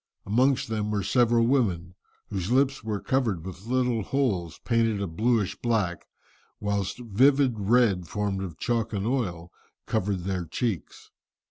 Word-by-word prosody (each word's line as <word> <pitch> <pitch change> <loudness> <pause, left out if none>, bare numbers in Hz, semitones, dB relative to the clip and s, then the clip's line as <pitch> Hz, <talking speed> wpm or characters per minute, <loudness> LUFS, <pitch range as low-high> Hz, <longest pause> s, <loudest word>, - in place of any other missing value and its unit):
Amongst 130 +6 +2
them 105 -1 -2
were 105 -2 -1
several 120 +2 +3
women, 95 -10 +1 0.4
whose 95 +2 -2
lips 135 -1 +2
were 110 -2 -2
covered 110 -11 0
with 95 +2 -9
little 125 -2 +1
holes, 100 - -1
painted 115 -3 +2
a 100 - -1
blueish 105 +4 0
black, 105 -8 -1 0.5
whilst 100 -2 -2
vivid 125 +2 +3
red 100 -4 +3
formed 100 -1 -2
of 90 -5 -6
chalk 115 -2 -1
and 100 -1 -2
oil, 95 -9 -2 0.3
covered 95 -1 -1
their 90 -1 -2
cheeks. 95 - -4
105 Hz, 140 wpm, -26 LUFS, 95-120 Hz, 0.5 s, several